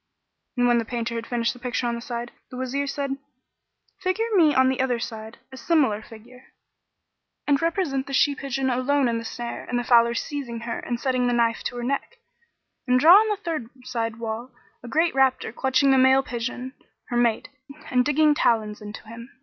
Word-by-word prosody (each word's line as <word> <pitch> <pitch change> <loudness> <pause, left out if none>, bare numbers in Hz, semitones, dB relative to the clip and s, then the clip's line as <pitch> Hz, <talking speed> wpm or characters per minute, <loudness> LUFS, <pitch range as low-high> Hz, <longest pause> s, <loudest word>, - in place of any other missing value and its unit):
And 245 0 +3
when 240 -1 +4
the - - -1
painter 235 0 -3
had 230 0 -4
finished 235 -1 0
his 245 - -16
picture 250 0 -2
on 235 - 0
one 235 - -5
side, 240 0 -5 0.2
the 250 - -9
Wazir 265 +2 -2
said, 275 -1 -3 0.8
"Figure 375 +4 0
me 330 -6 +5
on 260 0 +5
the 260 0 0
other 255 -2 +1
side 220 0 -7
a 260 - -10
similar 260 -7 +1
figure 235 +4 -14 1.0
and 285 0 +2
represent 330 -6 -1
the 275 - -6
she 285 +2 +3
pigeon 270 -2 -2
alone 260 +2 +1
in 230 -1 0
the - - -7
snare 235 +1 -6
and 245 - -2
the 245 - -1
fowler 235 -1 +4
seizing 240 -4 -4
her 235 0 -4
and 240 -1 -4
setting 255 -2 0
the 245 - +1
knife 235 -1 +1
to - - -3
her 240 - -4
neck; 275 - -3 0.7
and 250 0 +4
draw 320 +6 +8
on 430 +3 +6
the 415 -1 -1
third 310 -9 -3
side 230 -2 -3
wall, 230 +2 -5 0.3
a 245 - -10
great 320 +7 +1
raptor 265 -4 +1
clutching 265 +2 +2
the 265 - +5
male 265 +1 +5
pigeon, 250 +1 -5 0.4
her 240 - -1
mate, 235 -2 +1 0.4
and 250 -1 +3
digging 300 +2 +3
talons 215 -7 +1
into 210 0 -9
him." 230 +2 -10
250 Hz, 200 wpm, -24 LUFS, 235-275 Hz, 1.0 s, draw